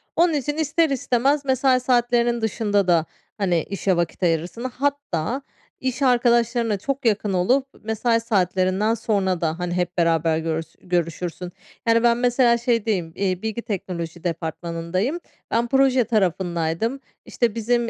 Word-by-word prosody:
Onun 340 Hz, 0 st, +3 dB
için 295 Hz, +1 st, -2 dB
ister 315 Hz, +1 st, +2 dB
istemez 275 Hz, +1 st, +1 dB
mesai 260 Hz, -1 st, +3 dB
saatlerinin 240 Hz, -1 st, +2 dB
dışında 205 Hz, -3 st, 0 dB
da, 170 Hz, -3 st, +3 dB, 0.3 s
hani, 180 Hz, -6 st, +1 dB
işe 195 Hz, -1 st, -1 dB
vakit 170 Hz, +2 st, -2 dB
ayırırsın. 170 Hz, +7 st, 0 dB
Hatta 260 Hz, -, -2 dB, 0.4 s
iş 260 Hz, +1 st, -3 dB
arkadaşlarına 235 Hz, -3 st, +2 dB
çok 275 Hz, +6 st, -4 dB
yakın 210 Hz, -2 st, +1 dB
olup, 250 Hz, +10 st, +2 dB, 0.2 s
mesai 225 Hz, +2 st, +1 dB
saatlerinden 190 Hz, -1 st, +1 dB
sonra 200 Hz, -5 st, 0 dB
da, 165 Hz, 0 st, -1 dB
hani, 180 Hz, -1 st, -2 dB
hep 180 Hz, 0 st, -2 dB
beraber 165 Hz, -1 st, +2 dB
görüs 160 Hz, 0 st, -3 dB
görüşürsün. 175 Hz, 0 st, -3 dB, 0.4 s
Yani, 230 Hz, 0 st, +4 dB
ben, 235 Hz, -1 st, +4 dB
mesela, 245 Hz, -1 st, +3 dB
şeydeyim, 225 Hz, -8 st, 0 dB
iii, 185 Hz, -2 st, -1 dB
bilgi 220 Hz, +1 st, -3 dB
teknoloji 175 Hz, -6 st, -5 dB
departmanındayım. 170 Hz, -, -2 dB, 0.3 s
Ben 235 Hz, +1 st, +1 dB
proje 265 Hz, 0 st, +3 dB
tarafındaydım, 185 Hz, +1 st, 0 dB, 0.3 s
işte, 235 Hz, -4 st, -1 dB
bizim, 235 Hz, +1 st, 0 dB
220 Hz, 135 wpm, -23 LUFS, 180-245 Hz, 0.4 s, Yani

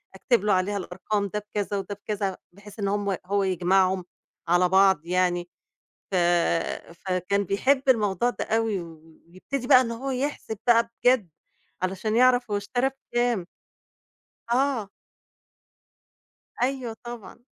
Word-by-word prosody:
أكتب 210 Hz, +2 st, +1 dB
له 210 Hz, -, +3 dB
عليها 190 Hz, +2 st, +1 dB
الأرقام 200 Hz, +2 st, -2 dB
ده 210 Hz, +2 st, -3 dB
بكذا 205 Hz, -1 st, -3 dB
وده 195 Hz, +1 st, -4 dB
بكذا 200 Hz, -3 st, -2 dB
بحيث 205 Hz, +3 st, -14 dB
إن 200 Hz, -, 0 dB
هم 200 Hz, -1 st, 0 dB
هو 200 Hz, +1 st, +1 dB
يجمعهم، 185 Hz, 0 st, +2 dB, 0.4 s
على 175 Hz, +1 st, +3 dB
بعض 190 Hz, -4 st, +4 dB
يعني. 175 Hz, -1 st, 0 dB, 0.6 s
ف -, -, +1 dB, 0.8 s
فكان 185 Hz, +3 st, -1 dB
بيحب 260 Hz, +9 st, +2 dB
الموضوع 220 Hz, -1 st, +3 dB
ده -, -, -4 dB
أوي 225 Hz, -4 st, 0 dB
و 160 Hz, -1 st, -13 dB
ويبتدي 240 Hz, +9 st, -5 dB
بقى 255 Hz, -, +8 dB
إن 235 Hz, -, -1 dB
هو 260 Hz, +4 st, -4 dB
يحسب 260 Hz, -4 st, -3 dB
بقى 230 Hz, -1 st, +4 dB
بجد. 245 Hz, -6 st, +4 dB, 0.5 s
علشان 195 Hz, +4 st, -1 dB
يعرف 245 Hz, -1 st, +4 dB
هو 205 Hz, -, +1 dB
اشترى 245 Hz, +6 st, 0 dB, 0.2 s
بكام. 240 Hz, -6 st, +1 dB, 1.1 s
آه. 250 Hz, -4 st, +1 dB, 1.7 s
أيوه 255 Hz, -3 st, -1 dB
طبعًا. 240 Hz, 0 st, -9 dB
205 Hz, 130 wpm, -25 LUFS, 185-240 Hz, 1.7 s, بقى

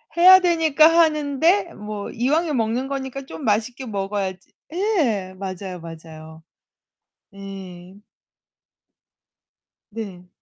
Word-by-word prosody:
해야 370 Hz, +2 st, +9 dB
되니까 325 Hz, -4 st, +4 dB
하는데 325 Hz, +2 st, +2 dB
뭐 210 Hz, -1 st, -6 dB
이왕에 300 Hz, +7 st, 0 dB
먹는 235 Hz, +2 st, -1 dB
거니까 275 Hz, 0 st, -5 dB
좀 160 Hz, -9 st, -9 dB
맛있게 230 Hz, +5 st, -1 dB
먹어야지. 195 Hz, -3 st, -4 dB, 0.2 s
예, 290 Hz, -, 0 dB
맞아요, 185 Hz, -1 st, -6 dB
맞아요. 160 Hz, -1 st, -11 dB, 0.9 s
네. 195 Hz, -2 st, -10 dB, 1.9 s
네. 195 Hz, -5 st, -8 dB
220 Hz, 195 characters per minute, -22 LUFS, 190-305 Hz, 1.9 s, 해야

